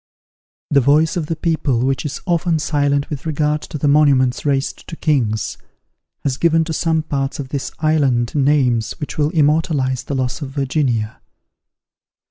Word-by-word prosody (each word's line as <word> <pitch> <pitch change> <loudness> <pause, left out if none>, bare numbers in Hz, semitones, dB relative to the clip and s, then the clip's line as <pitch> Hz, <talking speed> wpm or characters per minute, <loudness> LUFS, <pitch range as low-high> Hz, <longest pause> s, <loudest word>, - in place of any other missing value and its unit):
The 140 -1 +5
voice 150 +4 +3
of 165 -4 -2
the 165 - -2
people, 150 -7 0
which 135 +2 -1
is 145 - -6
often 170 -1 +1
silent 145 -2 0
with 150 +1 -5
regard 150 0 0
to - - -7
the 145 - 0
monuments 140 -4 +3
raised 135 -1 -1
to 165 - -7
kings, 120 -10 -1 0.6
has 135 -2 -1
given 165 0 +3
to 160 0 -4
some 160 0 0
parts 135 -3 -2
of 135 -2 -5
this 135 -2 -4
island 140 -7 +1
names 135 -6 +2
which 150 - -6
will 150 0 +2
immortalize 150 -4 +1
the 140 - -3
loss 130 +3 -2
of 140 - -4
Virginia. 135 -5 -1
145 Hz, 160 wpm, -19 LUFS, 130-155 Hz, 0.6 s, The